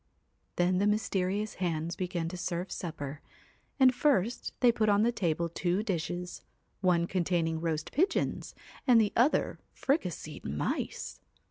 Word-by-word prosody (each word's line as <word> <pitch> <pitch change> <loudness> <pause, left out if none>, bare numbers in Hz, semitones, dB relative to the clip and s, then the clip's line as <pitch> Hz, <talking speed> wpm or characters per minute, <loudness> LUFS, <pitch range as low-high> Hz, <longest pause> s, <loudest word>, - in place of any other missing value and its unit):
Then 180 +1 +2
the 205 - +3
mysterious 205 0 0
hands 165 -1 -1
began 175 -3 -2
to 180 - -6
serve 180 0 -3
supper, 150 -4 -5 0.6
and 260 -1 +7
first 245 -5 +1
they 245 -2 +6
put 220 -2 +1
on 205 +1 +4
the 235 - +3
table 170 -6 0
two 175 +4 -1
dishes, 180 -2 -3 0.4
one 180 -3 +3
containing 170 -3 0
roast 160 -2 -2
pigeons 365 +8 0 0.3
and 245 -3 +7
the 210 -2 +2
other 250 +6 +2 0.2
fricasseed 180 - -2
mice. 75 +2 -3
180 Hz, 135 wpm, -30 LUFS, 170-215 Hz, 0.6 s, and